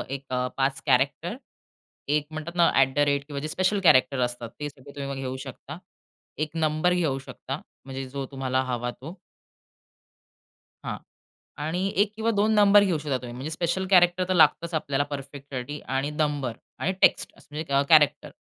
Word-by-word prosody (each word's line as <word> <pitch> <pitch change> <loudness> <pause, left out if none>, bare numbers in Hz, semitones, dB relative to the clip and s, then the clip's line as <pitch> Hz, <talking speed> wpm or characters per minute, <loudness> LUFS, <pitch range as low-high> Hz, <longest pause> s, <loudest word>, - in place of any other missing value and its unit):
एक 140 - -9
अ, 125 0 0
5 135 0 0
कॅरेक्टर, 140 - +1 0.7
एक 150 0 +1
म्हणतात 155 +2 -6
ना 170 -1 +5
@ 140 +1 +2
किंवा 140 -2 -5
जे 155 - -3
स्पेशल 185 +5 +1
कॅरेक्टर 135 -4 +5
असतात 120 -1 -2
ते 150 - -3
सगळे 140 0 -15
तुम्ही 140 0 -4
घेऊ 130 0 -3
शकता. - - -9 0.6
1 155 0 -2
नंबर 160 +2 +2
घेऊ 155 -7 0
शकता. 135 +1 -7 0.2
म्हणजे 135 0 -6
जो 140 0 -4
तुम्हाला 130 -1 -1
हवा 120 -1 -2
तो. 150 +9 -10 1.7
हां. - - -4 0.7
आणि 165 +4 -2 0.2
1 205 +1 +2
किंवा 225 +1 0
2 215 +2 +3
नंबर 205 0 +7
घेऊ 175 -5 +1
शकता 145 -3 -2
तुम्ही, 120 -1 -8
म्हणजे 135 +5 -5
स्पेशल 170 +4 -1
कॅरेक्टर 180 0 +5
तर 185 - +1
लागतंच 165 +1 +4
आपल्याला 145 -2 0
परफेक्टसाठी 140 0 -6 0.2
आणि 140 +2 -1
नंबर 145 -6 -1 0.2
आणि 190 - 0
टेक्स्ट - - +4 0.2
म्हणजे 150 -1 -5
अ, 140 - +5
कॅरेक्टर 155 -3 +5
145 Hz, 165 wpm, -26 LUFS, 135-170 Hz, 1.7 s, नंबर